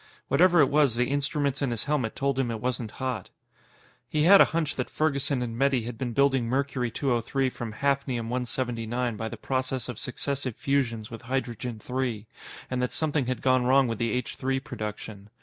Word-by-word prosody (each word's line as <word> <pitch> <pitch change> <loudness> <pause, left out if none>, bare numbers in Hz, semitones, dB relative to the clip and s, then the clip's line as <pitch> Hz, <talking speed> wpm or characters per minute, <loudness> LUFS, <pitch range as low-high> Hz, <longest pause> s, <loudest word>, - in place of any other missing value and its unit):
Whatever 175 +4 +5
it 140 - +4
was, 145 -5 +3
the 125 +1 +1
instruments 145 -1 0
in 140 - +1
his 115 -2 -2
helmet 140 -7 -1
told 140 -1 0
him 130 -3 +1
it 115 -1 -3
wasn't 125 -1 -2
hot. 125 -5 -4 0.8
He 150 -1 +1
had 195 +4 +9
a - - +9
hunch 160 -3 -1
that 125 - -3
Ferguson 140 -4 0
and 115 -2 -4
Metty 135 -1 +2
had 115 0 -6
been 125 -2 -2
building 135 -2 +3
Mercury 130 -1 0
203 130 +1 0
from 120 -2 -5
Hafnium 135 -2 0
179 120 -1 -2
by 110 +1 -4
the - - -7
process 130 -2 -2
of 125 -4 -6
successive 130 -1 -3
fusions 120 -5 -1
with 115 - -7
Hydrogen 125 -2 -3
3 125 -2 -3 0.5
and 125 -1 0
that 125 - 0
something 150 -4 0
had 130 -3 -2
gone 130 -1 +3
wrong 135 +1 +5
with 115 -2 -3
the 115 -1 +1
H 125 +3 -2
3 135 0 0
production. 105 -4 -7
130 Hz, 190 wpm, -27 LUFS, 115-140 Hz, 0.8 s, had